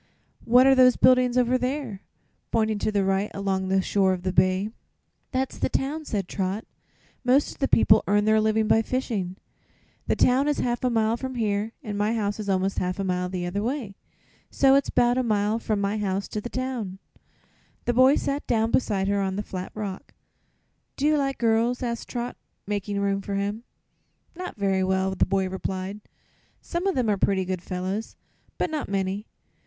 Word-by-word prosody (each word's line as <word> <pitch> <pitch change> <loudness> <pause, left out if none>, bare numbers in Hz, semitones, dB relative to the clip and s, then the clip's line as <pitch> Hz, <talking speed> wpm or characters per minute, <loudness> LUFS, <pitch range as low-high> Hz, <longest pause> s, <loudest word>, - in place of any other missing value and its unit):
"What 245 +3 +6
are 270 - +7
those 255 -1 +6
buildings 255 -1 +4
over 250 +1 +3
there?" 250 -6 -3 0.5
pointing 220 -2 +1
to 215 - 0
the 200 -2 +1
right, 195 +2 +1
along 195 -1 -1
the 190 0 +2
shore 190 -1 +2
of 180 -1 -5
the 185 -1 -1
bay. 185 +2 +2 0.6
"That's 260 0 -2
the - - 0
town," 295 +5 -2
said 200 -8 -2
Trot. 195 +3 -3 0.6
"Most 260 +3 +3
of - - -13
the 275 - +1
people 215 -3 +5
earn 205 +1 +3
their 215 0 +4
living 220 0 +2
by 225 - +4
fishing. 220 -7 -2 0.7
The - - +2
town 260 +3 +3
is 295 - +1
half 240 0 -1
a 250 - +3
mile 225 -1 +1
from 260 +1 -5
here 215 -1 -1
an' 210 -4 -4
my 210 +3 +1
house 205 -1 -2
is 205 -2 -4
almost 190 0 0
a - - +2
half 180 0 -2
mile 180 -2 -1
the 180 -1 -3
other 185 +3 -2
way; 240 -3 -3 0.6
so 270 -1 +4
it's 275 +1 +3
'bout 245 +1 +3
a - - +3
mile 215 -1 +1
from 215 -2 -1
my 200 +2 -1
house 195 -1 -1
to 210 - -4
the 240 - -6
town." 245 -8 -4 0.9
The 240 - +1
boy 260 +3 +6
sat 280 +1 -2
down 225 -1 +1
beside 195 -6 +1
her 200 0 +1
on 190 -1 -1
the 205 - -2
flat 185 -2 -6
rock. 200 -3 -6 0.8
"Do 280 - -2
you 305 0 +4
like 275 -2 0
girls?" 230 +2 +1
asked 235 -1 -4
Trot, 245 0 -4 0.3
making 205 0 -2
room 200 0 0
for 200 0 -4
him. 205 +4 -3 0.7
"Not 360 +1 -6
very 195 -2 +1
well," 190 0 +1
the 190 - +1
boy 190 -1 +1
replied. 190 +2 -4 0.6
"Some 350 +2 -3
of 385 - 0
'em 250 -3 +1
are 205 -2 +2
pretty 190 -1 +1
good 185 -1 -3
fellows, 185 +4 -4 0.4
but 335 - -1
not 305 -8 -3
many. 195 +2 -2
210 Hz, 195 wpm, -25 LUFS, 195-250 Hz, 0.9 s, are